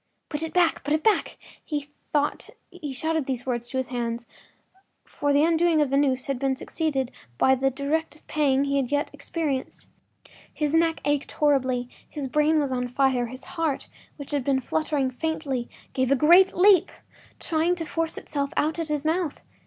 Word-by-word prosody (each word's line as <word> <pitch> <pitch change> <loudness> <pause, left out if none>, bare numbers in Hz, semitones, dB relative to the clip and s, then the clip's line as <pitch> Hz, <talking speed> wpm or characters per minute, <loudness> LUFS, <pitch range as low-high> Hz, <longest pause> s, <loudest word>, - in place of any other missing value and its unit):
“Put 295 -1 -2
it 325 -1 -3
back, 345 -2 +2
put 295 +2 +1
it 310 - -2
back!” 435 - +2 0.3
He 290 -2 -4 0.2
thought 290 -1 0 0.2
he 335 -6 -6
shouted 315 +2 -1
these 255 -3 -3
words 240 -2 -3
to 260 - -3
his 260 -1 -1
hands, 235 -1 -3 0.8
for 290 0 -1
the 285 +1 +4
undoing 330 0 +3
of 290 -3 +2
the - - +2
noose 265 -2 +2
had 275 -3 -2
been 270 0 +1
succeeded 270 -2 -2 0.3
by 265 - +5
the 265 +1 +2
direst 300 +4 -3
pang 280 -3 +2
that - - -2
he 280 0 +1
had 270 -2 -1
yet 290 0 0
experienced. 295 -6 -3 0.7
His 300 -1 -1
neck 325 0 +2
ached 290 -1 0
horribly; 260 -4 +1 0.2
his 290 -3 -4
brain 300 +3 +3
was 280 -3 0
on 250 -1 -1
fire, 250 -1 +1
his 255 +2 -8
heart, 320 -5 -2 0.3
which 285 -2 -8
had 285 -3 0
been 270 0 +2
fluttering 285 0 -1
faintly, 275 -3 -3 0.2
gave 260 0 +1
a - - +6
great 345 +7 +6
leap, 375 -1 +5 0.5
trying 330 +2 +1
to 330 -2 -4
force 325 +1 -2
itself 280 -1 -3
out 315 +2 +1
at 330 - -2
his 300 -1 -2
mouth. 325 -1 -1
290 Hz, 185 wpm, -25 LUFS, 265-320 Hz, 0.8 s, a